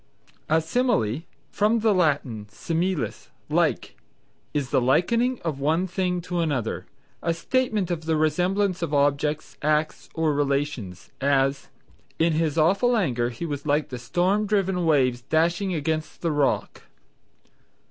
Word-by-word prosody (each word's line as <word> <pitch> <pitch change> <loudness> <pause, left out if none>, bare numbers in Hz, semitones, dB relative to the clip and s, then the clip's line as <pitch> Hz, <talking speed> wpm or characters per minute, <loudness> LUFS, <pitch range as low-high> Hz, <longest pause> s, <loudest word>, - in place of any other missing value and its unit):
A 160 +1 +4
Simile 165 - 0 0.3
(from 215 +2 +2
the 220 -1 +4
Latin 140 - 0
similis, 165 - -2 0.2
like), - - 0 0.6
is 145 -4 -2
the - - +3
likening 230 - +2
of 155 -5 -2
one 160 +6 +1
thing 180 -1 -1
to 175 0 -3
another, 145 -9 -1 0.3
a 170 0 0
statement 215 -2 0
of 165 -2 -3
the 160 0 +1
resemblance 180 +5 +1
of 155 -3 -1
objects, 145 +2 0
acts, 155 +1 0
or 160 -2 +1
relations; 140 - -2
as 135 0 +1 0.5
"In 165 0 +2
his 160 -1 0
awful 200 +10 +3
anger 120 - 0
he 125 +7 -6
was 145 -2 -5
like 150 +1 +1
the 125 - -6
storm 185 - +1
driven 190 -4 +1
waves 130 -5 +3
dashing 170 +7 +1
against 155 +1 -3
the 170 - 0
rock." 145 -2 0
160 Hz, 135 wpm, -25 LUFS, 140-180 Hz, 0.6 s, A